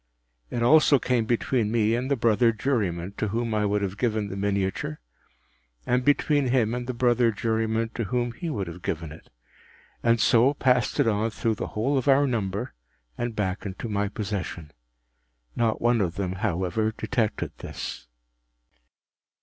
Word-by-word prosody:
” - - -48
It 120 - -2
also 150 +2 +6
came 125 -3 0
between 115 -1 0
me 110 -1 +2
and 125 +3 -1
the 140 - +3
brother 115 0 +3
juryman 100 -7 -1
to 110 - -1
whom 115 +2 -2
I 105 -1 +1
would 100 0 0
have 100 0 -4
given 110 -4 0
the 95 - -5
miniature, 100 -5 -2 0.9
and 125 +1 +1
between 145 0 +2
him 120 -3 +2
and 125 0 -4
the 130 - -2
brother 120 -1 +3
juryman 110 +1 -1
to 115 0 -4
whom 120 +2 -1
he 170 +8 -5
would 105 -10 -2
have 85 +1 -9
given 80 -2 -3
it, 80 - -13 0.7
and 115 0 +3
so 120 +6 +4
passed 125 -2 +1
it 140 - +4
on 110 +1 +1
through 115 +1 -1
the 105 - -6
whole 135 +6 +2
of 130 - -5
our 140 +1 +5
number, 110 -2 -2 0.4
and 120 -2 -3
back 95 -3 -2
into 100 +3 -5
my 100 -1 0
possession. 100 -7 -5 0.8
Not 115 -2 +1
one 120 -1 +3
of 90 -3 -1
them, 95 -2 -2
however, 95 +5 0
detected 120 -5 -1
this. - - -7
115 Hz, 170 wpm, -26 LUFS, 100-120 Hz, 0.9 s, also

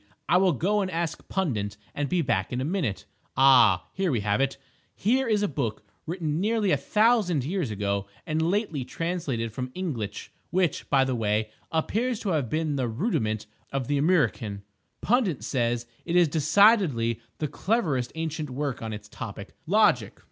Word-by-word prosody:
I 175 - +5
will 185 -2 +4
go 205 - +1
and 190 - -1
ask 165 -2 -3
Pundit 105 - -1 0.2
and 145 -1 -2
be 180 -2 +1
back 95 -8 0
in 125 - -2
a 130 - -1
minute.... 155 - -2 0.3
Ah, 135 0 +6
here 190 -3 0
we 120 -5 0
have 100 +4 +1
it! 135 0 0 0.4
Here 255 +5 +1
is 210 -2 +2
a - - +2
book 120 - -3 0.2
written 165 -2 -2
nearly 215 -1 +1
a - - +5
thousand 205 - +2
years 170 - -1
ago 100 -1 -2 0.2
and 155 0 -1
lately 170 - 0
translated 135 -7 -3
from 125 +2 -3
the 130 - -15
Inglitch—which, 165 - -3
by 135 -2 +4
the 130 -1 -1
way, 110 -2 0 0.2
appears 220 +9 0
to 205 - -2
have 150 -9 0
been 155 -2 -1
the 130 -2 0
rudiment 110 - -1 0.3
of 135 -2 -2
the 145 -1 +1
Amriccan. 135 - +1 0.4
Pundit 215 - +1
says 120 -2 0 0.2
it 170 - -2
is 175 -2 +6
decidedly 155 - +3 0.2
the 150 - -1
cleverest 150 - 0
ancient 160 -2 -3
work 135 0 -3
on 110 -1 -4
its 105 0 -8
topic, 100 -1 -8
Logic. 210 +5 +3
150 Hz, 170 wpm, -26 LUFS, 120-185 Hz, 0.4 s, Ah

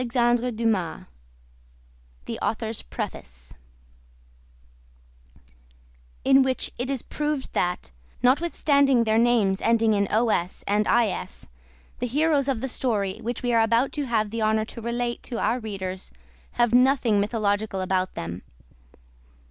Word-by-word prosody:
CONCLUSION 240 0 +2
EPILOGUE 210 -8 -1 1.4
AUTHOR'S - - -2
PREFACE 60 0 -7 2.7
In 270 0 +6
which 260 -1 0
it 250 +2 -2
is 270 -3 -2
proved 295 -2 -3
that, 180 - -1 0.3
notwithstanding 280 -2 +3
their 220 0 +2
names' 225 -5 +2
ending 225 -1 +3
in 200 -1 +1
os 215 -5 0
and 210 +1 +1
is, 230 -4 0 0.5
the 245 - -1
heroes 290 +2 +2
of 260 -5 -1
the 265 - -2
story 210 -7 -1
which 240 +2 -4
we 245 -1 0
are 230 - +5
about 230 +4 +2
to 290 -3 -3
have 215 -3 0
the 230 0 -3
honor 215 0 +2
to 230 - -9
relate 240 +1 -2
to 240 - -5
our 230 +4 +1
readers 190 -4 -5 0.4
have 240 -1 +2
nothing 250 -4 +4
mythological 205 -1 0
about 185 0 -1
them. 85 +2 -5
230 Hz, 125 wpm, -25 LUFS, 205-250 Hz, 2.7 s, In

